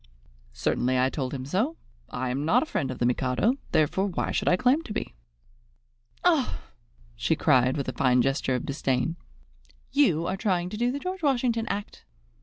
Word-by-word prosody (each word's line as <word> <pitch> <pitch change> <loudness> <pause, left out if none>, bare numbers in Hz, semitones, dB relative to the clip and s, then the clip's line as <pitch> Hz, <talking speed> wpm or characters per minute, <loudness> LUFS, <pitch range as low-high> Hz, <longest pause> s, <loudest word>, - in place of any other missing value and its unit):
"Certainly 130 - 0
I 130 +1 +2
told 130 -4 -3
him 130 -2 -5
so. 215 - -1 0.3
I 125 0 -3
am 135 +3 -2
not 220 - +3
a - - -4
friend 180 - -2
of 130 - -5
the 120 - 0
Mikado; 125 - +1 0.2
therefore 175 +6 +2
why 185 - -2
should - - -1
I 180 - +4
claim 260 - +3
to 235 -10 -7
be?" - - -4 1.1
"Oh!" 320 -7 +2 0.6
she 115 +7 +1
cried, 130 -4 +3
with 140 - -3
a 130 - -2
fine 125 0 +3
gesture 135 -1 0
of 125 - -3
disdain, 135 +2 -1 0.8
"you 215 - +3
are 185 +2 -2
trying 180 -4 0
to 210 - -6
do 240 +2 +1
the 275 - -3
George 370 +4 -5
Washington 245 -6 +1
act!" 205 0 -5
165 Hz, 185 wpm, -26 LUFS, -, 1.1 s, I